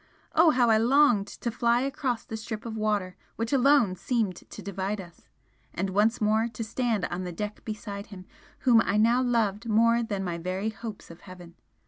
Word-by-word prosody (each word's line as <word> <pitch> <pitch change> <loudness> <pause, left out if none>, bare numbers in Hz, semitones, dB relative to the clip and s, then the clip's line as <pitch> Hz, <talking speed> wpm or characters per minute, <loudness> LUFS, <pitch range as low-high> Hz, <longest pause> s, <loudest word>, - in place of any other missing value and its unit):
Oh, 325 +1 +6
how 245 -5 +3
I 220 - +5
longed 240 -4 +4
to 235 - -5
fly 235 +1 +2
across 270 -3 -2
the 220 - -6
strip 220 0 -6
of 225 -1 -5
water 210 -4 -1 0.2
which 230 +4 -3
alone 270 -7 +4
seemed 215 -1 -1
to - - -11
divide 200 +1 -3
us! 175 -3 -12 0.5
and 190 +1 -2
once 215 +4 +2
more 220 +2 +2
to 225 - -4
stand 225 -3 -1
on 180 +1 -4
the 180 - -5
deck 210 +4 -6
beside 205 -2 -6
him 185 -3 -11 0.4
whom 235 -3 +5
I 200 +3 0
now 235 +4 +4
loved 230 -3 0
more 230 +2 +4
than 205 -4 -3
my 175 -2 -3
very 185 +5 -2
hopes 215 -3 -8
of 170 - -14
heaven! 180 -2 -12
220 Hz, 190 wpm, -27 LUFS, 195-235 Hz, 0.5 s, Oh